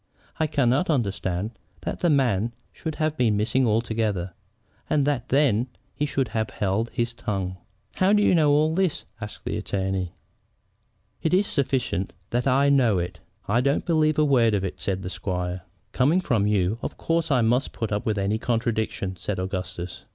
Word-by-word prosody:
I 160 - +2
cannot 140 +3 +2
understand 100 - -1 0.3
that - - -4
the 175 - +2
man 120 -6 +2 0.2
should 160 -2 -5
have 155 0 0
been 115 -6 +2
missing 120 +4 +2
altogether, 110 -5 0 0.6
and 145 -2 +2
that 140 -4 -1
then 130 -4 +3 0.3
he 150 - -1
should 135 -3 -1
have 110 -1 -1
held 105 +4 -1
his 115 -1 -1
tongue." 95 -6 -3 0.4
"How 185 +1 +4
do 210 0 +4
you - - +4
know 155 -4 +4
all 155 +2 +3
this?" 185 -2 0 0.2
asked 105 0 -8
the - - -2
attorney. 95 -2 -2 1.1
"It 165 +2 +2
is 200 +2 +3
sufficient 130 - -1 0.2
that 120 +3 0
I 135 +2 +4
do 140 - +5
know 115 -7 +3
it." 90 0 -3 0.3
"I 115 +4 +3
don't 140 +2 +1
believe 155 -2 +2
a 155 - +4
word 120 -6 +4
of 100 - -1
it," 95 - -4
said 95 -1 -2
the 90 - -4
squire. 90 -2 -3 0.3
"Coming 150 +8 +3
from 115 - +1
you, 105 +1 +1
of - - -5
course 165 -1 0
I 130 -4 +3
must 120 +4 +2
put 110 -2 -4
up 105 +2 -1
with 110 -3 0
any 100 +2 0
contradiction," 110 -5 -1
said 100 0 -3
Augustus. 90 -2 -5
115 Hz, 180 wpm, -25 LUFS, 100-140 Hz, 1.1 s, do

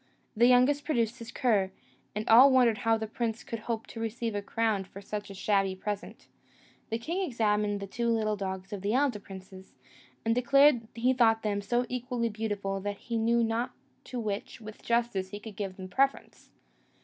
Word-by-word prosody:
The 235 +3 +5
youngest 255 +4 +4
produced 240 -5 0
his 230 -1 -8
cur, 210 -7 +2 0.5
and 210 +1 -3
all 245 +5 +9
wondered 245 -4 +4
how 225 0 +2
the 220 - -3
prince 225 +1 -3
could 230 - -5
hope 225 0 -3
to 230 - -9
receive 225 0 -3
a 205 - -2
crown 220 -1 0
for 190 +1 -11
such 205 +1 -6
a 195 - -8
shabby 195 -1 +1
present. 205 +1 -5 0.6
The 225 - -1
king 335 +11 -3
examined 210 - 0
the 200 - -5
two 235 +4 -2
little 215 -2 +1
dogs 190 -1 -5
of 200 - -5
the 205 +4 0
elder 265 -5 +2
princes, 190 -2 -12 0.5
and 225 - +3
declared 250 0 +4
he 245 +3 +2
thought 225 -3 +3
them 205 -1 0
so 240 +4 0
equally 245 -1 -2
beautiful 205 -3 -3
that 205 +1 -4
he 230 +2 -4
knew 235 +1 +3
not 230 +2 -1 0.3
to 250 - -5
which, 210 -1 -4
with 215 -1 -10
justice, 235 -5 0
he 205 +1 -7
could 215 -1 -10
give 195 -3 -5
the 185 -1 -7
preference. 270 +9 -1
225 Hz, 190 wpm, -29 LUFS, 205-240 Hz, 0.6 s, all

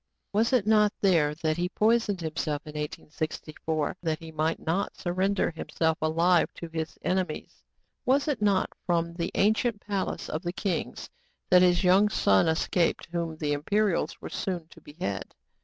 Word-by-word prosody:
^ - - -55 0.3
Was 220 +3 +2
it 250 -6 +3
not 210 -1 +4
there 160 -7 +3
that 155 0 +1
he 175 +1 0
poisoned 215 -3 +2
himself 155 -2 -2
in 150 - -7
1864, 155 0 -4
that 160 -3 -1
he 165 0 -10
might 160 +1 0
not 180 +5 -2
surrender 185 +2 0
himself 160 0 -1
alive 165 +3 +3
to 170 - -7
his 160 -1 -4
enemies? 185 0 -2 0.4
Was 275 +4 +2
it 290 -7 -1
not 200 -3 +2
from 170 -1 0
the 170 0 -2
ancient 220 +2 +2
palace 200 -2 -3
of 155 - -3
the 175 -1 -3
kings 190 -2 -3 0.4
that 180 0 +8
his 180 0 +4
young 190 +3 +5
son 100 - +3
escaped, 165 +2 +1
whom 170 -2 -3
the 150 -2 -1
Imperials 200 +6 0
were - - -7
soon 175 -4 -3
to - - -16
behead 145 - -5
175 Hz, 165 wpm, -28 LUFS, 160-200 Hz, 0.4 s, that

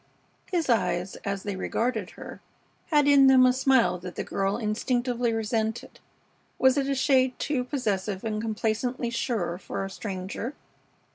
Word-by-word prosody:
His 345 -3 0
eyes, 185 -6 0
as 200 -1 -4
they 205 -2 -3
regarded 220 +1 -2
her, - - -9 0.5
had 295 -3 +3
in 280 -1 +7
them 260 -1 +7
a 250 - +5
smile 255 -8 +3
that 180 0 -8
the - - -3
girl 195 +1 -1
instinctively 240 +2 0
resented. 225 0 -2 0.6
Was 260 0 +4
it 275 -2 0
a 275 - +1
shade 260 -2 +2
too 275 -4 -1
possessive 210 -8 -2
and 215 -1 -2
complacently 225 +2 -2
sure 220 -8 -2
for 195 - -4
a 195 - -7
stranger? 195 +7 -5
230 Hz, 150 wpm, -26 LUFS, 200-255 Hz, 0.6 s, in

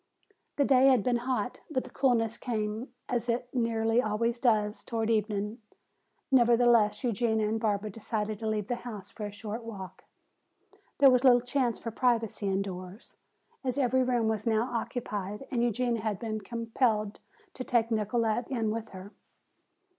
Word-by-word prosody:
The 285 - +2
day 265 0 +5
had 255 -6 +5
been 245 +1 +2
hot, 250 -1 -2
but 260 -5 -1
the - - -12
coolness 230 -4 +2
came, 220 0 -3 0.2
as 240 -1 -2
it 245 +1 -2
nearly 230 -1 +2
always 230 +2 -1
does, 215 -4 +1
toward 225 -1 -1
evening. 210 0 -1 0.7
Nevertheless, 240 -3 +4
Eugenia 220 -2 +1
and 220 +1 -1
Barbara 210 -1 -1
decided 215 0 -3
to 225 - -3
leave 215 -2 -1
the 245 +3 -2
house 215 -6 -8
for 210 -2 -5
a - - -8
short 215 +3 -6
walk. 195 -5 -9 0.9
There 275 -2 +7
was 250 0 +3
little 250 -2 +7
chance 245 -1 0
for 230 - -6
privacy 230 -3 0
indoors, 190 +1 -4 0.5
as 255 0 -2
every 260 -1 +2
room 245 -3 +1
was 220 0 -1
now 230 +3 +1
occupied 210 -2 -4
and 240 -3 0
Eugenia 240 0 0
had 215 -2 -1
been 215 -1 -4
compelled 225 -1 -1 0.3
to 255 - -5
take 235 -2 +1
Nicolete 220 +2 0
in 225 -5 -1
with 225 0 -4
her. 190 +2 -10
230 Hz, 160 wpm, -29 LUFS, 215-245 Hz, 0.9 s, There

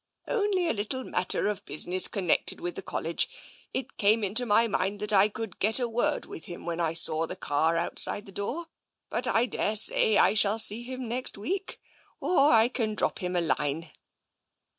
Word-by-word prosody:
Only 405 -5 0
on - - +2
a - - -9
little 260 +6 -3
matter - - +1
of 210 -2 -3
business 180 +5 +3
connected 185 -5 -1
with 355 0 -4
the - - -6
College. - - -2 0.4
It 260 +1 -5
came 215 +2 +3
into 220 +5 0
my 230 +2 +3
mind 200 -1 -2
that 210 0 +3
I 200 +1 +5
could 220 -2 -7
get 220 +5 +3
a 245 - -1
word 240 +6 -1
with - - -9
him 175 - -8
when 170 0 -3
I 165 -2 0
saw 160 0 +2
the 180 - -6
car 160 -1 0
outside 190 +4 0
the 195 - -11
door. 235 - -4 0.5
But 245 - +1
I 235 0 +2
daresay 215 -1 +2
I 195 - +4
shall 210 0 +3
see 220 0 +3
him 255 0 -7
next 250 0 -1
week 375 - -4 0.2
— - - -34
or 295 -5 +3
I 225 0 +5
can 225 -4 -3
drop - - -1
him 180 0 -3
a 175 - +2
line." 155 0 -2
210 Hz, 200 wpm, -27 LUFS, 185-245 Hz, 0.5 s, I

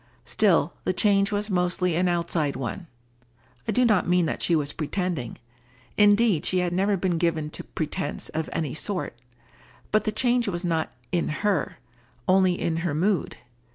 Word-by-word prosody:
Still, - - +2
the - - 0
change 200 -1 +3
was 210 +1 -2
mostly 180 -1 +1
an 180 +2 +2
outside 170 -4 0
one. 170 +8 -5 0.8
I - - +1
do 250 0 +3
not 215 -7 +3
mean 180 -1 +3
that - - -3
she 170 - +2
was 145 -2 -1
pretending. 160 - -3 0.6
Indeed 205 -3 +4
she 185 - +1
had 180 -1 0
never 195 +2 +1
been 175 -2 0
given 160 -3 0
to - - -6
pretence 150 -2 -4
of 160 0 -3
any 155 -5 -2
sort. 185 +3 -3 0.8
But 215 - +2
the 215 - +1
change 240 +1 +1
was 180 -2 -2
not 165 -2 -1 0.2
in 175 - 0 0.2
her, 205 -3 0 0.5
only 185 -1 +3
in 165 -1 -1
her 165 -3 -2
mood. 185 +2 0
180 Hz, 165 wpm, -25 LUFS, 165-200 Hz, 0.8 s, Indeed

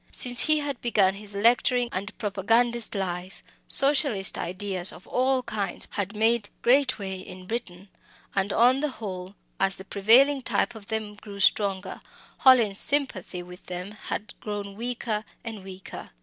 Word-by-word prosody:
Since 245 -1 +3
he 310 0 +4
had 285 -3 -3
begun 200 -5 +3
his 200 0 -7
lecturing 245 +3 +3
and 195 +2 -5
propagandist 225 +3 +1
life, 185 -1 -4 0.2
Socialist 270 -8 +2
ideas 185 0 -2
of - - -13
all 260 0 +1
kinds 210 -6 -3
had 200 +1 -3
made 220 0 +2
great 255 +1 +4
way 190 -2 -5
in 185 0 -10
England. 195 -4 -5 0.5
And, 195 0 0
on 250 +3 +4
the 300 +1 0
whole, 190 -6 -7 0.2
as 195 0 +3
the 190 - -8
prevailing 250 +9 +5
type 240 - 0
of 215 -3 -12
them 220 -1 -3
grew 205 -1 -11
stronger, 195 -1 +1 0.4
Hallin's 235 -7 +5
sympathy 235 -11 0
with 180 +1 -13
them 180 +2 -5
had 210 0 -6
grown 205 -1 -5
weaker 230 -2 -3 0.2
and 220 -4 -7
weaker. 190 -1 -9
210 Hz, 150 wpm, -26 LUFS, 195-240 Hz, 0.5 s, prevailing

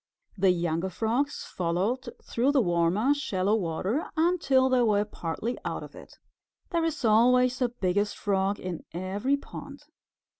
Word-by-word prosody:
The 195 -1 +3
younger 170 0 0
Frogs 230 +10 -1
followed 190 +9 -2
through 260 +5 +1
the 275 - +4
warmer 175 +9 +2
shallow 210 -8 0
water 195 - -2
until 315 -6 +3
they 255 -1 +3
were 210 -3 +3
partly 210 +5 -4
out - - -4
of - - -11
it. - - -14 0.5
There 335 -2 +1
is 315 -6 -2
always 250 +3 +4
a 250 - +2
Biggest 205 -2 -1
Frog 195 0 0
in 180 -3 -5
every 200 +10 0
pond. 280 0 -10
220 Hz, 145 wpm, -27 LUFS, 185-260 Hz, 0.5 s, the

